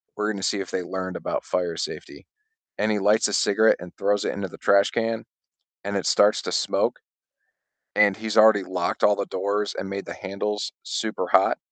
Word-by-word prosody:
we're 105 Hz, -, -1 dB
going 100 Hz, -2 st, -5 dB
to -, -, 0 dB
see 100 Hz, -, -1 dB
if 95 Hz, -, -5 dB
they 90 Hz, -, -2 dB
learned 95 Hz, 0 st, -5 dB
about -, -, -3 dB
fire 90 Hz, -2 st, -2 dB
safety," -, -, -6 dB, 0.5 s
and 110 Hz, +1 st, +1 dB
he 105 Hz, -, 0 dB
lights 105 Hz, +3 st, +3 dB
a 105 Hz, -, -4 dB
cigarette 110 Hz, +3 st, +3 dB
and 90 Hz, 0 st, -9 dB
throws 105 Hz, 0 st, +1 dB
it -, -, -1 dB
into 100 Hz, -1 st, -4 dB
the -, -, -12 dB
trash 100 Hz, 0 st, +3 dB
can 115 Hz, -1 st, -2 dB, 0.6 s
and 100 Hz, 0 st, -2 dB
it 95 Hz, -, -1 dB
starts 105 Hz, +1 st, +4 dB
to -, -, -4 dB
smoke, -, -, 0 dB, 1.0 s
and 100 Hz, -2 st, +4 dB
he's 110 Hz, -1 st, -4 dB
already 110 Hz, -2 st, +6 dB
locked 90 Hz, -2 st, -3 dB
all 105 Hz, -, +4 dB
the 100 Hz, -, -2 dB
doors 105 Hz, +1 st, -1 dB
and 95 Hz, -, -5 dB
made 100 Hz, 0 st, -5 dB
the -, -, -6 dB
handles 105 Hz, +2 st, -4 dB
super -, -, -3 dB
hot, -, -, +4 dB
100 Hz, 205 wpm, -24 LUFS, 95-105 Hz, 1.0 s, already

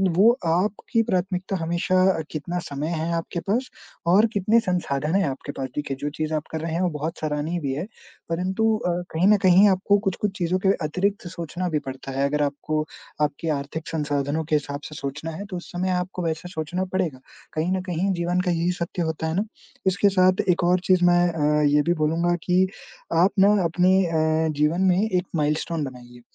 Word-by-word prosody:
वो 210 Hz, +6 st, +7 dB
आपकी 195 Hz, +7 st, +1 dB
प्राथमिकता 185 Hz, -2 st, -1 dB
हमेशा 170 Hz, +2 st, -1 dB, 0.2 s
अ, 165 Hz, -, -2 dB
कितना 170 Hz, +3 st, -3 dB
समय 145 Hz, +2 st, -4 dB
है 165 Hz, 0 st, -2 dB
आपके 165 Hz, +1 st, -3 dB
पास 225 Hz, +9 st, -1 dB, 0.4 s
और 195 Hz, +6 st, +6 dB
कितने 210 Hz, +3 st, +3 dB
संसाधन 165 Hz, -5 st, -1 dB
हैं 195 Hz, -, +3 dB
आपके 135 Hz, +1 st, -6 dB
पास 130 Hz, -1 st, -4 dB
देखिए, 145 Hz, -2 st, -3 dB
जो 145 Hz, -, -1 dB
चीज़ 155 Hz, +1 st, -3 dB
आप 155 Hz, -1 st, -1 dB
कर 160 Hz, -, -3 dB
रहे 165 Hz, 0 st, -3 dB
हैं 170 Hz, -, 0 dB
वो 180 Hz, -, +2 dB
बहुत 155 Hz, +2 st, -4 dB
सराहनीय 155 Hz, +3 st, -2 dB
भी 135 Hz, -2 st, -2 dB
है, 150 Hz, -, -3 dB, 0.5 s
परंतु 190 Hz, +6 st, +1 dB
अ, -, -, +2 dB, 0.2 s
कहीं 165 Hz, +4 st, +3 dB
न 210 Hz, 0 st, +6 dB
कहीं 185 Hz, +2 st, +7 dB
आपको 195 Hz, +2 st, +3 dB
कुछ-कुछ 195 Hz, +2 st, 0 dB
चीज़ों 180 Hz, +1 st, 0 dB
के 190 Hz, -, +2 dB, 0.2 s
अतिरिक्त 195 Hz, +5 st, -1 dB
सोचना 175 Hz, +1 st, -4 dB
भी 155 Hz, -2 st, 0 dB
पड़ता 135 Hz, +1 st, -7 dB
है, 140 Hz, -, +3 dB
अगर 150 Hz, +1 st, +1 dB
आपको 155 Hz, +2 st, -2 dB, 0.4 s
आपके 150 Hz, +2 st, -1 dB
आर्थिक 150 Hz, +2 st, -3 dB
संसाधनों 145 Hz, 0 st, -1 dB
के 155 Hz, -, +1 dB
हिसाब 145 Hz, -1 st, -2 dB
से 155 Hz, -, -10 dB
सोचना 145 Hz, +3 st, -5 dB
है, 190 Hz, +6 st, -6 dB
तो 190 Hz, -3 st, -6 dB
उस 175 Hz, -, -10 dB
समय 185 Hz, +1 st, -1 dB
आपको 180 Hz, 0 st, -2 dB
वैसा 165 Hz, +2 st, -3 dB
सोचना 175 Hz, +2 st, -3 dB
पड़ेगा। 170 Hz, -8 st, -1 dB, 0.3 s
कहीं 160 Hz, +3 st, -1 dB
न -, -, -3 dB
कहीं 185 Hz, +1 st, -1 dB
जीवन 175 Hz, +1 st, 0 dB
का 180 Hz, -1 st, 0 dB
यही 170 Hz, +1 st, +1 dB
सत्य 175 Hz, 0 st, -4 dB
होता 160 Hz, 0 st, -2 dB
है 160 Hz, -, -2 dB
ना? 200 Hz, -, +1 dB, 0.4 s
इसके 190 Hz, +2 st, +4 dB
साथ 185 Hz, -1 st, +3 dB
एक 175 Hz, +1 st, +2 dB
और 180 Hz, +1 st, +3 dB
चीज़ 185 Hz, -1 st, +5 dB
मैं 175 Hz, 0 st, +5 dB
अ, 150 Hz, -2 st, +1 dB
ये 145 Hz, 0 st, +4 dB
भी 170 Hz, +4 st, +1 dB
बोलूँगा 170 Hz, +3 st, +1 dB
कि 185 Hz, +1 st, +3 dB, 0.6 s
आप 195 Hz, -, +2 dB
ना 200 Hz, +2 st, +6 dB
अपनी 180 Hz, +3 st, +3 dB
अ, 160 Hz, -1 st, +1 dB
जीवन 160 Hz, +4 st, +2 dB
में 180 Hz, +2 st, +2 dB
एक 180 Hz, -3 st, 0 dB
माइलस्टोन 155 Hz, +1 st, 0 dB
बनाइए, 125 Hz, -2 st, -9 dB
170 Hz, 205 wpm, -24 LUFS, 150-185 Hz, 0.6 s, वो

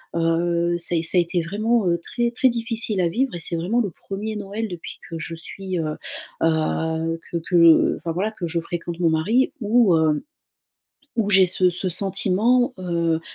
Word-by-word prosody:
heu, 170 Hz, +1 st, +1 dB
ça 175 Hz, 0 st, +2 dB
a -, -, +3 dB
é -, -, +1 dB
ça 170 Hz, -, +1 dB
a -, -, +7 dB
été 175 Hz, +1 st, -1 dB
vraiment, 215 Hz, +5 st, 0 dB
heu, 170 Hz, 0 st, +1 dB
très 240 Hz, -1 st, -1 dB
très 255 Hz, +2 st, +3 dB
difficile 230 Hz, -4 st, -2 dB
à 175 Hz, -, +2 dB
vivre 255 Hz, +8 st, -1 dB
et -, -, -5 dB
c'est 170 Hz, +1 st, -3 dB
vraiment 200 Hz, +9 st, +1 dB
le 205 Hz, -, -1 dB
1er 205 Hz, +6 st, -6 dB
Noël 205 Hz, +2 st, -4 dB
depuis 175 Hz, -3 st, -8 dB
que 165 Hz, -, -5 dB
je 165 Hz, 0 st, -5 dB
suis, 185 Hz, +3 st, -6 dB
heu 155 Hz, -1 st, -2 dB, 0.5 s
heu, 160 Hz, 0 st, 0 dB
que 170 Hz, -, -1 dB
que 170 Hz, -1 st, +4 dB
enfin 165 Hz, -, -4 dB
voilà, 200 Hz, +6 st, -1 dB
que 200 Hz, -5 st, -6 dB
je 170 Hz, +1 st, -1 dB
fréquente 170 Hz, 0 st, -5 dB
mon 170 Hz, -2 st, +3 dB
mari 200 Hz, +12 st, +2 dB
où 215 Hz, -5 st, +4 dB
hem, 155 Hz, -2 st, +2 dB, 1.0 s
où 220 Hz, -3 st, +1 dB
j'ai 190 Hz, -2 st, +6 dB
ce 180 Hz, +1 st, +2 dB
ce 180 Hz, +2 st, -2 dB
sentiment, 200 Hz, -, +2 dB
heu 170 Hz, -3 st, 0 dB
175 Hz, 195 wpm, -22 LUFS, 165-215 Hz, 1.0 s, a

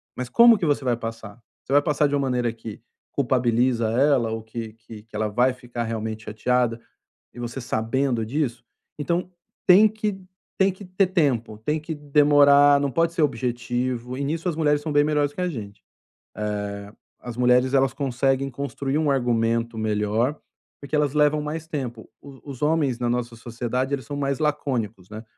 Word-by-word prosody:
Mas, 125 Hz, -1 st, -5 dB
como 235 Hz, -2 st, +7 dB
que 180 Hz, -, -2 dB
você 145 Hz, -3 st, +1 dB
vai 120 Hz, -2 st, +1 dB
passar? 115 Hz, -1 st, -7 dB, 0.2 s
Você 135 Hz, -, -4 dB
vai 145 Hz, -, +6 dB
passar 150 Hz, 0 st, +1 dB
de 145 Hz, -, -1 dB
uma 140 Hz, -, +1 dB
maneira 125 Hz, -3 st, 0 dB
que 110 Hz, -1 st, -9 dB, 0.3 s
culpabiliza 120 Hz, -3 st, +1 dB
ela 130 Hz, -2 st, +2 dB
ou 110 Hz, 0 st, -3 dB
que 110 Hz, -1 st, -7 dB
que 110 Hz, -1 st, -13 dB
que 110 Hz, -1 st, -16 dB
ela 110 Hz, 0 st, 0 dB
vai 125 Hz, +4 st, +2 dB
ficar 120 Hz, -2 st, -6 dB
realmente 110 Hz, -1 st, -4 dB
chateada? 120 Hz, +2 st, 0 dB, 0.6 s
E -, -, -12 dB
você 120 Hz, +2 st, -5 dB
sabendo 115 Hz, +1 st, -1 dB
disso? 120 Hz, -2 st, -2 dB, 0.3 s
Então 175 Hz, +4 st, -1 dB, 0.4 s
tem 200 Hz, +4 st, +8 dB
que 210 Hz, -2 st, -3 dB, 0.4 s
tem 190 Hz, 0 st, +3 dB
que 195 Hz, +2 st, -12 dB
ter 185 Hz, +1 st, +1 dB
tempo, 130 Hz, -, 0 dB
tem 150 Hz, +8 st, -1 dB
que 160 Hz, +1 st, -5 dB
demorar, 145 Hz, -1 st, +5 dB
não 140 Hz, -, 0 dB
pode 165 Hz, +6 st, +1 dB
ser 165 Hz, -, -1 dB
objetivo, 125 Hz, -2 st, -2 dB
e 140 Hz, -, -2 dB
nisso 165 Hz, +5 st, -2 dB
as 165 Hz, -, -2 dB
mulheres 150 Hz, -2 st, +2 dB
são 155 Hz, -, -4 dB
bem 145 Hz, 0 st, +4 dB
melhores 150 Hz, -1 st, +1 dB
que -, -, -6 dB
a 180 Hz, -, 0 dB
gente. 105 Hz, -9 st, -8 dB, 0.6 s
Eh, 105 Hz, -1 st, -4 dB, 0.3 s
as 120 Hz, -1 st, -8 dB
mulheres, 125 Hz, +1 st, +3 dB
elas 135 Hz, -1 st, +3 dB
conseguem 135 Hz, 0 st, 0 dB
construir 140 Hz, +2 st, -3 dB
um 155 Hz, -2 st, +1 dB
argumento 115 Hz, -2 st, 0 dB
melhor, 110 Hz, +5 st, 0 dB, 0.5 s
porque 140 Hz, +2 st, -4 dB
elas 145 Hz, -2 st, +1 dB
levam 150 Hz, 0 st, +3 dB
mais 155 Hz, +2 st, -5 dB
tempo. 125 Hz, -7 st, -5 dB
Os 140 Hz, -2 st, -13 dB
os 140 Hz, -3 st, -9 dB
homens 150 Hz, -5 st, +1 dB
na 120 Hz, -, -1 dB
nossa 120 Hz, -1 st, -2 dB
sociedade, 125 Hz, +3 st, -3 dB
eles 130 Hz, -4 st, -2 dB
são 145 Hz, -, -5 dB
mais 140 Hz, -2 st, -1 dB
lacônicos. 125 Hz, -11 st, -2 dB
né? 110 Hz, +1 st, -8 dB
130 Hz, 180 wpm, -24 LUFS, 115-145 Hz, 0.6 s, tem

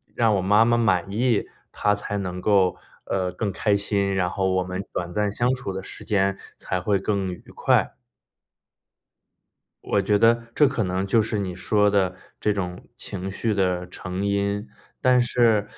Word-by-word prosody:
让 115 Hz, -3 st, +3 dB
我 95 Hz, -, +1 dB
妈 105 Hz, +4 st, +5 dB
妈 120 Hz, 0 st, +3 dB
满 95 Hz, -5 st, +1 dB
意， 115 Hz, +1 st, +1 dB, 0.2 s
她 105 Hz, 0 st, +1 dB
才 105 Hz, 0 st, -4 dB
能 90 Hz, -2 st, -4 dB
够， 95 Hz, -3 st, +3 dB, 0.3 s
呃， 90 Hz, -2 st, -1 dB
更 105 Hz, -3 st, -3 dB
开 105 Hz, +2 st, +1 dB
心， 100 Hz, -1 st, 0 dB
然 90 Hz, -2 st, +1 dB
后 95 Hz, 0 st, 0 dB
我 95 Hz, 0 st, +1 dB
们 90 Hz, +2 st, -4 dB
短 90 Hz, 0 st, -3 dB
暂 105 Hz, -1 st, 0 dB
相 120 Hz, +4 st, +1 dB
处 125 Hz, -7 st, -5 dB
的 95 Hz, -, -4 dB
时 -, -, -9 dB
间 100 Hz, -2 st, +1 dB, 0.2 s
才 95 Hz, -, -3 dB
会 100 Hz, +1 st, +1 dB
更 95 Hz, -2 st, -1 dB
愉 -, -, -12 dB
快。 -, -, +2 dB, 1.9 s
我 100 Hz, -, +1 dB
觉 100 Hz, +1 st, +2 dB
得 115 Hz, +1 st, +4 dB
这 150 Hz, -, +5 dB
可 130 Hz, -5 st, -1 dB
能 95 Hz, +1 st, -1 dB
就 115 Hz, +2 st, +4 dB
是 105 Hz, -1 st, -2 dB
你 90 Hz, -3 st, -3 dB
说 105 Hz, +2 st, +2 dB
的 95 Hz, -2 st, +1 dB, 0.2 s
这 105 Hz, -, +1 dB
种 90 Hz, -3 st, -4 dB
情 95 Hz, -1 st, -6 dB
绪 110 Hz, +2 st, -1 dB
的 90 Hz, -2 st, 0 dB
成 90 Hz, +2 st, -5 dB
因， 100 Hz, +1 st, -1 dB, 0.3 s
但 125 Hz, -1 st, +5 dB
是 115 Hz, -4 st, +2 dB
100 Hz, 190 characters per minute, -24 LUFS, 95-105 Hz, 1.9 s, 妈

